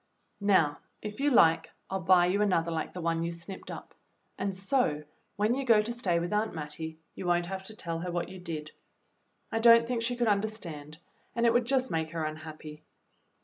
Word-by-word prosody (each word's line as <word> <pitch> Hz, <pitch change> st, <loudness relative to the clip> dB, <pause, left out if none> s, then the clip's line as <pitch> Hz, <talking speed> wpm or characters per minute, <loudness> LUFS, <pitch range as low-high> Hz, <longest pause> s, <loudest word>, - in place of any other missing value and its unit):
Now, 185 Hz, -8 st, +3 dB, 0.2 s
if 210 Hz, +2 st, -6 dB
you 290 Hz, +1 st, +3 dB
like, 165 Hz, -, +5 dB, 0.2 s
I'll 190 Hz, -, -2 dB
buy 180 Hz, 0 st, +5 dB
you 190 Hz, +3 st, +1 dB
another 170 Hz, -5 st, +2 dB
hke 160 Hz, -1 st, -3 dB
the 180 Hz, -, -5 dB
one 165 Hz, 0 st, 0 dB
you 170 Hz, 0 st, -1 dB
snipped 170 Hz, +3 st, -7 dB
up, -, -, -8 dB, 0.4 s
and 195 Hz, -1 st, -2 dB
so, 190 Hz, -, +1 dB, 0.3 s
when 210 Hz, +3 st, +2 dB
you 275 Hz, +2 st, -1 dB
go 230 Hz, -4 st, +5 dB
to 220 Hz, +3 st, -1 dB
stay 190 Hz, -8 st, +1 dB
with 175 Hz, +4 st, -3 dB
Aunt 210 Hz, -2 st, 0 dB
Mattie, 160 Hz, +1 st, -6 dB, 0.2 s
you 185 Hz, -, -6 dB
won't 175 Hz, 0 st, +2 dB
have 190 Hz, +1 st, -5 dB
to 220 Hz, -, -8 dB
tell 165 Hz, -5 st, -3 dB
her 180 Hz, +1 st, -4 dB
what 175 Hz, 0 st, -2 dB
you 185 Hz, 0 st, -9 dB
did. 155 Hz, -3 st, -6 dB, 0.8 s
I 225 Hz, -, 0 dB
don't 230 Hz, 0 st, +7 dB
think 240 Hz, -2 st, -1 dB
she 245 Hz, +2 st, -1 dB
could 240 Hz, -1 st, 0 dB
understand, 195 Hz, -8 st, -2 dB, 0.4 s
and 235 Hz, 0 st, +2 dB
it 230 Hz, -, +5 dB
would 240 Hz, 0 st, +3 dB
just 260 Hz, 0 st, +1 dB
make 160 Hz, 0 st, -2 dB
her 165 Hz, -2 st, -1 dB
unhappy. 155 Hz, 0 st, -7 dB
185 Hz, 205 wpm, -29 LUFS, 165-220 Hz, 0.8 s, don't